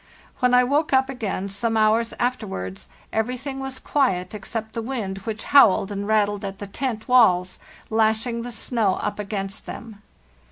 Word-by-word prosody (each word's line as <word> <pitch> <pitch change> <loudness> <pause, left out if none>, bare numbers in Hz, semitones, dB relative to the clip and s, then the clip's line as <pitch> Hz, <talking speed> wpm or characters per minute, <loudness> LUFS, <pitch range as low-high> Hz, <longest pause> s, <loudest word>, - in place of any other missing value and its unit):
When 250 -1 +4
I 250 - +6
woke 285 +4 +1
up 265 0 +4
again, 210 -7 -3
some 225 +3 -1
hours 220 +2 +3
afterwards, 195 - -3 0.3
everything 255 +5 -2
was 270 -1 -4
quiet 205 -12 0
except 220 +2 -5
the 230 - -3
wind, 220 -6 -4
which 220 -1 -4
howled 220 -8 +5
and 200 0 -4
rattled 205 -2 +1
at 195 -1 -5
the 205 - -6
tent 220 +2 -4
walls, 185 -8 +4 0.3
lashing 220 +2 +1
the 245 +1 -6
snow 225 -4 0
up 205 - -3
against 200 0 -5
them. 220 -3 -9
220 Hz, 160 wpm, -23 LUFS, 200-250 Hz, 0.3 s, I